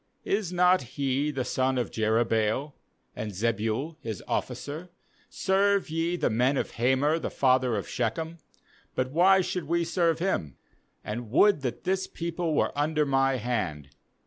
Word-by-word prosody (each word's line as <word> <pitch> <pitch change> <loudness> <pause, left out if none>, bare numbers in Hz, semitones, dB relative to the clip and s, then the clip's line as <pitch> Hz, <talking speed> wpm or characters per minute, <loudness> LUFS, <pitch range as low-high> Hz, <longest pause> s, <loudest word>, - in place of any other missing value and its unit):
is 200 -3 0
not 180 +1 +4 0.2
he 140 +1 0
the 135 -4 -2
son 130 0 0
of 125 - -1
Jerubbaal? 110 +4 +1 0.4
and 105 -1 -5
Zebul 115 - -1
his 110 -5 -5
officer? 155 +5 -3 0.4
serve 195 -2 +1
ye 165 +2 0
the 155 -8 0
men 125 +5 +2
of - - -2
Hamor 130 +6 +2
the - - -3
father 130 -3 +2
of 100 - -3
Shechem; 165 +1 -3 0.6
but 130 0 -1
why 190 +5 +5
should 180 -2 -3
we 170 +3 +1
serve 170 -1 +1
him? 80 - -2 0.5
2*And 115 +1 -5
would 200 - +4
that 125 -3 -4
this 190 +1 0
people 170 -1 -3
were - - +1
under 150 +1 +1
my 135 -1 +2
hand! 105 - -3
140 Hz, 150 wpm, -27 LUFS, 120-170 Hz, 0.6 s, why